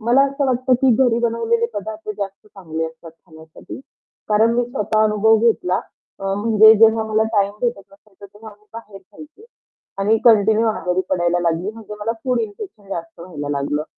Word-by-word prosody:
मला 240 +5 +3
असं 275 0 -2
वाटतं, 255 0 +1
की 260 -3 +4
घरी 235 -2 +1
बनवलेले 230 0 0
पदार्थ 215 +2 -7
जास्त 195 0 -6
चांगले 165 -6 -6
असतात 160 +1 -12
खाण्यासाठी 160 +4 -14 0.5
कारण 220 +2 +3
मी 245 0 +1
स्वतः 215 -2 -1
अनुभव 215 +1 +3
घेतला 215 -5 +1 0.4
अ, 195 - -9
म्हणजे 220 +1 +5
जेव्हा 225 0 +4
मला 220 0 0
टाईम 200 -1 +1
भेटत 240 -4 -1
नसायचा 200 0 -19
तेव्हा 210 +2 -14
मी 210 - -30
बाहेर 215 -3 -11
खायची 305 - -16 0.5
आणि 205 +3 +2
कंटिन्यू 220 -1 +4
आजारी 185 -4 -1
पडायला 175 -1 0
लागली 170 +3 -1
म्हणजे 220 -1 -10
मला 220 +2 -1
फूड 250 -2 0
इन्फेक्शन 220 - -8
जास्त 165 -3 -7
व्हायला 155 -5 -7
लागलं. 145 +1 -2
215 Hz, 170 wpm, -19 LUFS, 190-230 Hz, 0.5 s, म्हणजे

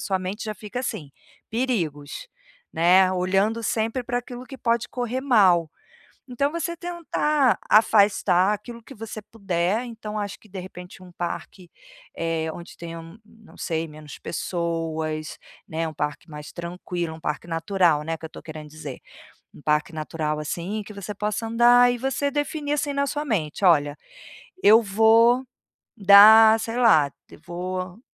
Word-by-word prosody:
sua 190 -2 -1
mente 185 +4 -5
já 215 -1 -4
fica 215 +4 -6
assim: 150 - -5 0.4
"Perigos", 205 - -2 0.5
né, 185 +3 +4
olhando 195 +5 +1
sempre 225 +3 -1
pra 245 +1 -1
aquilo 245 0 -8
que 270 - -9
pode 235 0 0
correr 245 0 -3
mal. 190 - +4 0.6
Então 280 +4 0
você 340 0 -3
tentar 305 -6 0
afastar 205 -3 +4
aquilo 235 +3 -9
que 270 - -13
você 215 -1 -8
puder, 195 0 -1
então 215 -2 -6
acho 205 -2 -4
que - - -20
de 190 -1 -7
repente 180 0 -11
um 180 - -13
parque, 175 +1 -6 0.5
eh, 165 -1 -2
onde 170 +1 -11
tenham, 165 +3 -9
não 220 0 -19
sei, 165 -1 -3
menos 150 -1 -11
pessoas, 160 -3 -3 0.3
né, 160 +1 -2
um 155 - -9
parque 150 +2 -4
mais 150 0 -9
tranquilo, 175 -1 -5
um 160 - -12
parque 150 +1 -4
natural, 165 -2 +1
né, 165 +1 -3
que 160 - -8
eu 160 - -14
tô - - -11
querendo 155 -1 -9
dizer. 145 -3 -8 0.5
Um - - -15
parque 150 +2 0
natural 155 0 -3
assim, 175 +7 -4
que 210 - -11
você 200 +1 -6
possa 210 +2 -3
andar 240 +2 +5
e 245 - -4
você 270 +3 -1
definir 290 0 -3
assim 290 -1 -1
na 280 0 0
sua 295 +2 -3
mente: 190 - -1
"Olha, 145 -4 +4 0.6
eu 220 +3 +7
vou 225 +5 +4 0.5
dar, 220 +3 +8
sei 225 +2 -4
lá, 160 - +5 0.3
vou 185 +2 -5
195 Hz, 155 wpm, -24 LUFS, 165-230 Hz, 0.6 s, dar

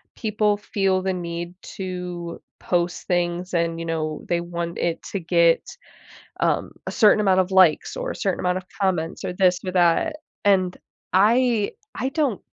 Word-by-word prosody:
people 210 -1 +1
feel 195 -2 0
the 190 0 -1
need 170 0 -5 0.2
to 180 -2 -5 0.2
post 175 -1 -1
things 175 0 -1
and, 165 -1 0
you 165 - -4
know, 155 -1 -2
they 175 - +2
want 170 0 -4
it 170 -1 -1
to 200 - 0
get, 170 -1 +3 0.8
um, - - +1
a - - -3
certain 210 0 +5
amount 190 -2 +3
of 185 0 +1
likes, 185 -5 +4
or - - -3
a - - -6
certain - - -1
amount 180 0 +1
of 185 - -7 0.2
comments, 175 -4 0
or - - -2
this 180 -1 +3
or 185 - -2
that, 180 - +2 0.3
and 185 -3 +3 0.4
I 225 +2 +3 0.2
I 260 - -1
don't 275 - 0
180 Hz, 165 wpm, -23 LUFS, 170-200 Hz, 0.8 s, certain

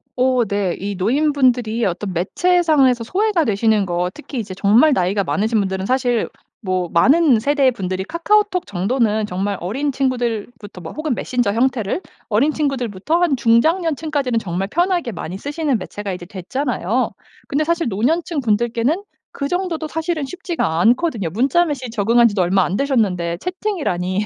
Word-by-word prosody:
오. 255 -2 +2
네 200 -3 -1
이 200 +1 -4
노인분들이 245 0 +1
어떤 190 +1 -2
매체상에서 280 - +2
소외가 380 - +1
되시는 215 -3 +2
거 175 0 -1
특히 295 -4 -7
이제 205 -4 -5
정말 215 +10 +4
나이가 195 -2 +1
많으신 215 +3 0
분들은 190 -1 -2
사실 250 -3 +1 0.3
뭐 185 -3 -1
많은 275 - +5
세대의 275 +2 +2
분들이 190 -4 -3
카카오톡 365 - +1
정도는 215 +3 0
정말 195 +1 -2
어린 265 +12 -2
친구들부터 235 -6 -3
뭐 - - -7
혹은 310 -4 -2
메신저 245 -5 -1
형태를 240 - 0 0.3
어린 235 +8 +3
친구들부터 275 - -1
한 320 -6 +3
중장년층까지는 290 +1 +1
정말 190 -1 -3
편하게 345 - 0
많이 180 0 -6
쓰시는 285 +1 -1
매체가 205 -2 -6
이제 180 -1 -7
됐잖아요. 225 +4 -2 0.4
근데 290 +2 0
사실 335 -2 0
노년층 295 - 0
분들께는 235 - 0 0.3
그 280 - -3
정도도 350 -2 -2
사실은 320 -1 -2
쉽지가 335 - -2
않거든요. 235 - +2
문자 260 - +2
메시지 270 -7 -4
적응한 230 +2 +4
지도 205 -4 0
얼마 185 +2 +3
안 180 - -2
되셨는데 195 -11 0
채팅이라니 210 - -2
240 Hz, 380 characters per minute, -19 LUFS, 200-300 Hz, 0.4 s, 많은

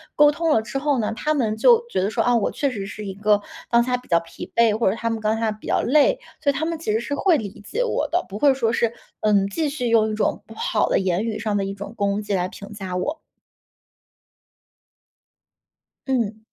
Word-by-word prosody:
沟 295 0 +6
通 330 +2 -1
了 220 - +4
之 220 +4 -5
后 285 -1 +1
呢， 215 - -1
他 305 +7 -1
们 220 -7 0
就 470 - +5
觉 - - 0
得 195 - +1
说， - - 0
啊， 245 - +3
“我 210 - +1
确 280 -2 -1
实 200 -4 -5
是 210 +1 -7
一 195 - -4
个 205 +1 +2 0.3
当 235 0 +4
下 250 0 0
比 250 - -16
较 170 -1 +3
疲 165 - -10
惫”， 230 -2 +5
或 225 - +2
者 195 - -1
他 230 0 -2
们 225 - -2
当 220 +1 0
下 225 -1 0
比 210 0 -10
较 - - +2
累， 305 - +4 0.2
所 290 - +2
以 280 - +1
他 315 - -1
们 330 0 -2
其 310 - -2
实 220 - +2
是 260 +4 -3
会 345 0 +3
理 205 -3 -7
解 - - -1
我 375 -10 -1
的， 350 +2 +1
不 200 - -6
会 280 +1 +5
说 235 -4 0
是， 230 -1 +1 0.3
嗯， 205 -2 +3
继 310 +10 -1
续 250 -4 -2
用 220 -1 +3
一 - - -3
种 215 - -1
不 225 - -12
好 220 -1 0
的 - - +3
言 190 +2 0
语 220 -2 -3
上 215 -1 -1
的 195 - 0
一 195 - -4
种 200 +2 -8
攻 200 +1 0
击 205 -1 -3
来 180 -1 +1
评 200 +2 -11
价 190 -3 -5
我。 295 - -2 2.9
嗯。 230 -5 0
225 Hz, 260 characters per minute, -23 LUFS, 205-280 Hz, 2.9 s, 沟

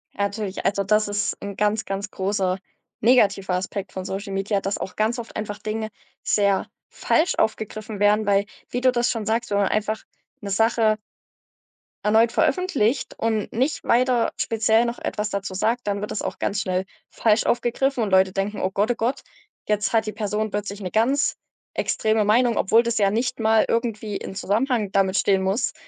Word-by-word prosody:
A 200 - -1
natürlich, 200 -1 -3
also, 200 0 +1
das 210 +2 +2
ist 205 0 -1
'n 200 0 -6
ganz, 210 +2 0
ganz 195 +2 -4
großer 190 -1 -1 0.4
negativer 200 -5 +3
Aspekt 190 +1 -4
von 185 -1 -5
Social 195 +1 -5
Media, 195 +1 0
dass 195 +1 -2
auch 190 - -6
ganz 225 +3 0
oft 230 - -8
einfach 205 -1 -4
Dinge 215 +1 -3 0.3
sehr 200 -2 +2 0.2
falsch 345 +4 +1
aufgegriffen 215 -1 -2
werden. 210 +1 +3
Weil 200 0 +3 0.2
wie 245 - -2
du 255 0 +5
das 240 -1 +1
schon 225 -3 -3
sagst, 230 +2 -1
wenn 200 - +2
man 200 - +3
einfach 215 +1 -1 0.4
'ne 200 - -5
Sache 220 +1 +3 1.1
erneut 220 +2 +4
veröffentlicht 275 - +1
und 220 -2 -1
nicht 265 +6 -1
weiter 245 0 +2
speziell 225 +1 +2
noch 235 0 -3
etwas 210 0 -3
dazu 195 -1 -3
sagt, 225 +6 0
dann 200 -1 -1
wird 210 - -5
das - - -3
auch - - -4
ganz 200 0 -1
schnell 185 0 -1 0.2
falsch 220 -1 +2
aufgegriffen 245 +2 +1
und 215 - 0
Leute 190 0 +4
denken: 195 +2 -2
„Oh 185 - 0
Gott, 205 +5 +1
oh - - -1
Gott, 240 +4 -1 0.5
jetzt 210 0 +1
hat 225 -1 +2
die 215 - -4
Person 215 0 -2
plötzlich 205 0 -4
'ne 185 -3 -5
ganz 265 +7 +2 0.4
extreme 220 0 +1
Meinung“, 230 +3 +3
obwohl 225 +4 +4
das 235 -1 0
ja 200 -1 +3
nicht 245 +4 -1
mal 220 0 +4
irgendwie 225 -3 -1
in - - -5
Zusammenhang 215 +2 0
damit 195 -1 +2
stehen 195 -1 +2
muss, 195 +5 0
215 Hz, 185 wpm, -23 LUFS, 200-230 Hz, 1.1 s, du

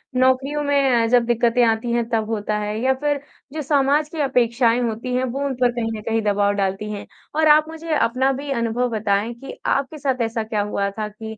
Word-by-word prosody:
नौकरियों 260 +3 +2
में 275 -4 +3
अ, - - +2
जब 245 0 +3
दिक्कतें 240 +1 +2
आती 225 +1 0
हैं 235 -1 0
तब 225 -2 -1
होता 210 -1 -1
है 210 +1 -3
या 265 +1 +3
फिर 290 -1 0 0.3
जो 310 - -3
समाज 290 +1 +2
की 320 - -7
अपेक्षाएँ 240 -2 +2
होती 235 +2 -3
हैं, 255 - +1
वो 265 +3 -2
उन 275 - -1
पर 245 - +4
कहीं 235 -2 -2
न - - -7
कहीं 225 0 +1
दबाव 205 -1 +1
डालती 195 +1 -2
हैं? 205 -1 -6 0.3
और 315 0 +3
आप 305 0 +6
मुझे 325 0 -5
अपना 255 +3 +2
भी 280 +2 -6
अनुभव 235 0 0
बताएँ 215 0 0
कि 255 +4 -10
आपके 275 +3 0
साथ 270 -4 -1
ऐसा 225 -1 -1
क्या 215 -1 -2
हुआ 200 -1 -1
था 215 - -1
कि 220 +1 -9
240 Hz, 220 wpm, -21 LUFS, 220-275 Hz, 0.3 s, आप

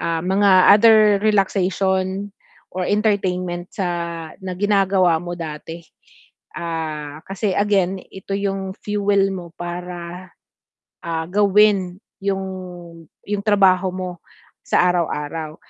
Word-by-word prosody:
ah, 165 -1 -1
mga 195 +2 +3 0.2
other 220 +2 +7 0.2
relaxation 195 -1 0 0.4
or 180 0 -2
entertainment 185 -4 0
sa 170 -3 -4
na 185 -1 -5
ginagawa 190 -4 +2
mo 175 0 -6
dati. 165 +1 -7 0.7
Ah, 155 -3 -5
kasi 195 +1 -1
again 195 -2 +1
ito 190 +1 -8
'yong 195 -1 -3
fuel 200 -1 +1
mo 175 -2 -8
para, 175 +1 -6 0.8
ah, 165 -1 -2
gawin 200 -2 +3 0.3
'yong 195 -1 -1 0.8
'yong 205 -1 -2
trabaho 190 -2 +4
mo 185 -1 -4 0.5
sa - - +3
araw-araw. 155 -2 -3
185 Hz, 105 wpm, -20 LUFS, 175-200 Hz, 0.8 s, other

